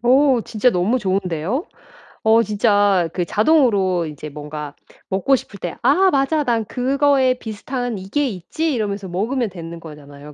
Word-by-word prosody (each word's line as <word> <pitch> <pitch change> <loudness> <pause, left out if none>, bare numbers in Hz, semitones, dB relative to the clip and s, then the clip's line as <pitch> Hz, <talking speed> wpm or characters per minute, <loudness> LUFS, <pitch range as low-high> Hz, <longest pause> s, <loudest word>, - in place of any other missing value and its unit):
어 260 +1 +4
진짜 225 +3 +1
너무 210 +6 +1
좋은데요? 190 - -2 0.6
어 220 +1 +5
진짜 205 -3 +2
그 180 - -1
자동으로 205 - +2
이제 150 0 -8
뭔가 150 0 -7 0.4
먹고 195 +8 +2
싶을 200 -5 -7
때 175 -2 -5
‘아 380 +1 +4
맞아. 285 +2 +1
난 230 -3 0
그거에 265 +1 +2
비슷한 245 +1 -5
이게 205 +10 -1
있지.‘ 265 - -3
이러면서 205 -4 -3
먹으면 220 +6 -1
되는 170 -2 -8
거잖아요. 150 -2 -12
210 Hz, 310 characters per minute, -20 LUFS, 175-255 Hz, 0.6 s, 어